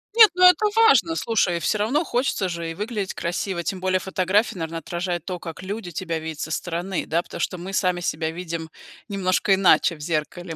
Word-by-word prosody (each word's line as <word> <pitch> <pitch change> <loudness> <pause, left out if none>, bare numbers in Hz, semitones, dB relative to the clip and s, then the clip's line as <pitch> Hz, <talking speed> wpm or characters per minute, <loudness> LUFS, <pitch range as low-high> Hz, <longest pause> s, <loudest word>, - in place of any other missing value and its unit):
Нет, 440 -2 +9
ну, 365 0 +1
это 365 +4 +7
важно, 330 - +5
слушай. 190 - +1
Всё 190 - 0
равно 250 +11 +1
хочется 245 -9 -1
же 170 -1 -4
и - - -5
выглядеть 210 0 -4
красиво. 175 +1 -3
Тем 185 +2 -3
более 185 0 +1
фотография, 190 +4 0
наверно, 165 0 -4
отражает 175 +1 -3
то, 180 -2 -4
как 165 -1 -8
люди 195 -1 -5
тебя 170 0 -3
видят 160 -1 -7
со 155 - -4
стороны. 175 +3 -3
Да, 165 +2 0
потому - - -10
что 180 - -2
мы 190 +2 -7
сами 180 -2 +1
себя 160 -2 -2
видим 165 -1 -5 0.4
немножко 195 -1 +1
иначе 185 -2 +4
в - - -17
зеркале. 165 +2 -3
180 Hz, 200 wpm, -23 LUFS, 170-205 Hz, 0.4 s, Нет